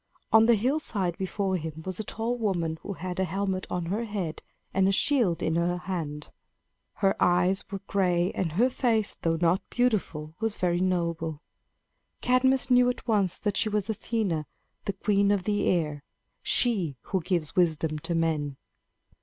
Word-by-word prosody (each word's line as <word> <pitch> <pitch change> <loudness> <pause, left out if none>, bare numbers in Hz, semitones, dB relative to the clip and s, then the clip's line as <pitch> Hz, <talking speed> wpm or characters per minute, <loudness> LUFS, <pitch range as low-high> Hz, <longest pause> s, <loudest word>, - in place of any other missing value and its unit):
On 220 0 +7
the 235 - +6
hillside 215 - 0
before 190 0 -1
him 160 -1 -6
was 185 0 -4
a - - -1
tall 225 +4 -2
woman 175 -8 -1
who 200 - -5
had 180 0 -5
a - - +3
helmet 190 +1 -2
on 175 -1 -2
her 205 +7 -2
head 195 -7 -4 0.3
and 190 0 +3
a - - +4
shield 225 - +2
in 160 - +1
her 170 +1 +1
hand. 160 -5 -5 0.6
Her 195 -2 +1
eyes 180 +2 +3
were 195 -1 -5
gray, 180 -2 +1
and 165 -5 -2
her 230 +9 +4
face, 225 -5 0
though 165 -1 +1
not 175 +3 +3
beautiful, 190 -11 0
was 225 -1 -1
very 175 -1 +1
noble. 170 -4 -1 0.8
Cadmus 260 +1 +2
knew 250 0 +6
at 250 - -5
once 200 -5 +2
that 205 -1 -1
she 220 - +2
was 210 0 0
Athena, 200 -8 -2 0.4
the 200 - -1
queen 200 +1 +2
of 200 -2 +2
the 205 +1 0
air 150 -5 0 0.4
she 190 - +2
who 190 - -2
gives 170 -3 -2
wisdom 160 -3 +2
to 170 +3 -2
men. 155 -4 0
185 Hz, 170 wpm, -27 LUFS, 170-215 Hz, 0.8 s, On